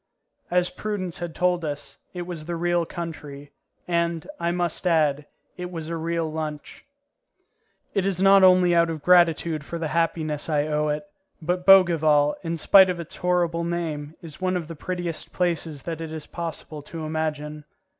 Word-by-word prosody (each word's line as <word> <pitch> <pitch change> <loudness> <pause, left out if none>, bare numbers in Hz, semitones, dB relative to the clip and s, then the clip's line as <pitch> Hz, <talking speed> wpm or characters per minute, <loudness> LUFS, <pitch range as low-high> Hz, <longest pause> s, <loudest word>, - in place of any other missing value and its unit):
As 180 0 +1
Prudence 195 -5 -4
had 170 -2 -5
told 180 -1 +1
us, 145 -2 -5
it 180 -1 -5
was 170 -3 -6
the 170 +1 -3
real 175 0 0
country, 150 -5 -7 0.4
and, 170 -1 0
I 170 - 0
must 175 0 -1
add, 150 -4 +2 0.3
it 180 0 -5
was 165 -3 -6
a 170 - -2
real 165 0 -1
lunch. 155 -1 -6 1.1
It 195 -1 +1
is 190 -3 -1
not 195 0 +6
only 180 -1 +6
out 170 0 +4
of 155 -3 -5
gratitude 170 -3 +4
for 170 - -6
the 165 -2 -3
happiness 160 -2 -1
I 150 -1 +1
owe 150 0 0
it, 150 +3 -1 0.4
but 180 +2 -2
Bougival, 160 -6 +6
in 165 -1 -3
spite 190 +4 +7
of 180 -1 -2
its 170 - -7
horrible 175 -2 +1
name, 160 -3 -3
is 160 +1 -10
one 185 0 +1
of 165 -3 -5
the 165 - -7
prettiest 175 0 -4
places 165 -5 -1
that 165 -1 -5
it 160 -1 -5
is 155 -2 -6
possible 160 -2 -6
to 160 +2 -7
imagine. 150 -1 -3
165 Hz, 175 wpm, -24 LUFS, 155-175 Hz, 1.1 s, spite